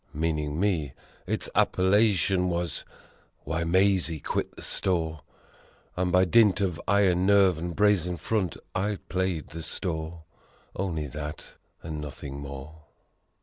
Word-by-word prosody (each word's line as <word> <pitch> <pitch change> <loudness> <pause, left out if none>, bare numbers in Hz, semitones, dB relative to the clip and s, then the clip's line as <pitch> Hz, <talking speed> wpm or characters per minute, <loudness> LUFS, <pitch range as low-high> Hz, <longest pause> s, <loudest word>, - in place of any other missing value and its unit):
(Meaning 75 -1 -1
me) 85 -9 0 0.3
Its - - -1
appellation 95 -1 +3
was 85 -4 -2 0.6
"Why 80 +3 -2
Mazie 90 -2 +2
Quit - - -3
the - - -9
Store." 80 -4 -1 0.8
And 90 0 0
by 90 +1 +5
dint 105 +1 +5
of 90 -5 -1
iron 95 -2 +3
nerve 100 -4 +5
and 85 0 -4
brazen 95 -4 +2
front 105 -4 -1 0.2
I 100 +2 0
played 95 -4 -1
the 85 +2 -7
store: 80 0 -4 0.5
Only 85 -5 -2
that 75 +2 -7 0.3
and 75 -2 -5
nothing 70 -1 -7
more. 70 +2 -9
85 Hz, 125 wpm, -27 LUFS, 80-95 Hz, 0.8 s, by